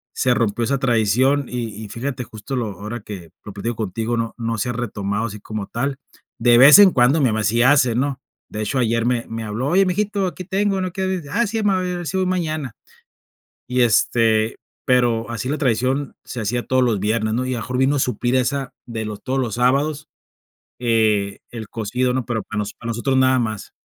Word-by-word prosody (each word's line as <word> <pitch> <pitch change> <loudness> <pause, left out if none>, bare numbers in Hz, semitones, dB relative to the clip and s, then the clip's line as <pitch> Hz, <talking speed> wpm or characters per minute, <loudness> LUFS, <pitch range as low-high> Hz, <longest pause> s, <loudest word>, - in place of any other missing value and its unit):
se 125 -1 +2
rompió 115 -1 0
esa 140 +2 0
tradición, 130 +3 +2
y 115 -3 -5
y - - -11
fíjate 125 +3 -4
justo 110 +5 -7
lo 120 -3 -1
ahora 110 +3 -5
que 95 -5 -9 0.2
lo 105 - -8
platico 115 +4 -3
contigo, 110 +3 -2
no 115 -1 -2
no 115 -1 -2
se 125 - -1
ha - - -2
retomado 105 -2 -2
así 105 -1 -8
como 105 -2 -5
tal. 135 +3 -2 0.4
De 120 0 +5
vez 145 +8 +10
en 200 -2 +9
cuando 135 +3 +3
mi 130 - +4
mamá 110 -1 0
sí 115 +3 +2
hace, 130 -2 +4
¿no?, 135 +1 -1 0.3
de 105 - -5
hecho 130 +5 -1
ayer 115 -1 +1
me 120 -1 0
me 115 0 -4
habló: 110 +5 -3
"Oye, 190 +3 +4
mijito, 200 +1 0
aquí 185 +1 -6
tengo, 195 0 0
no 185 -1 -2
quieres", 190 -4 -2
ah 235 +6 +2
sí, 220 +1 -2
mamá, 195 -2 +2
a - - -3
ver 175 -2 -3
si 190 - -2
voy 190 - +1
mañana. 155 -8 -2 0.9
Y, 125 0 +1
este, 115 -1 +2 0.3
pero 120 -3 +2
así 115 +2 -4
la 150 - -1
tradición 130 +1 0
se 125 - -6
hacía 120 +3 -2
todos 130 -1 +3
los 115 -5 +1
viernes, 110 +1 0
¿no?, 125 +2 -1
y 130 - -2
a - - -3
lo - - -5
mejor 125 +5 -3
vino 135 +2 +3
a - - 0
suplir 125 +1 0
esa, 135 +1 0
de 115 -2 -5
los, 105 -1 -6
todos 135 +1 -1
los 120 -5 -2
sábados, 140 +5 +1 0.7
eh, 110 -4 +1
el 115 -3 -7
cocido, 125 +3 -1
¿no?, 130 -2 -1
pero 115 -3 -2
para 110 - -5
noso 105 - -3
para 115 - -6
nosotros 130 +4 0
nada 130 0 +4
más. 110 -3 -4
120 Hz, 220 wpm, -21 LUFS, 110-140 Hz, 0.9 s, vez